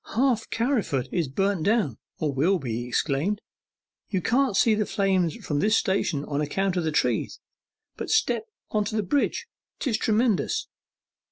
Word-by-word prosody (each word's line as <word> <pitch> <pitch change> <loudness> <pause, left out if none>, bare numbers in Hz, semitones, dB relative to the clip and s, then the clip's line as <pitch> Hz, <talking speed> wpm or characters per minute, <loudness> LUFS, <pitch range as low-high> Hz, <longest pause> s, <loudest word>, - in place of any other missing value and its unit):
'Half 245 -2 +2
Carriford 215 - 0
is 170 -5 0
burnt 195 +6 0
down, 185 - +1 0.2
or 150 -3 -1
will 165 +9 +3
be!' 120 -8 -3
he 120 - -6
exclaimed. 150 +10 0 0.7
'You 190 - 0
can't 245 +2 +2
see 225 +2 +5
the 210 -1 0
flames 190 -5 +1
from 145 - 0
this 215 +5 +3
station 185 -6 0
on 145 0 -2
account 190 +6 0
of 175 - 0
the 160 - 0
trees, 150 - 0 0.6
but - - -5
step 440 - +2 0.2
on 210 -1 +2
the 215 0 -1
bridge 280 +9 0 0.3
'tis 240 -6 0
tremendous! 225 - +1
195 Hz, 160 wpm, -26 LUFS, 150-220 Hz, 0.7 s, see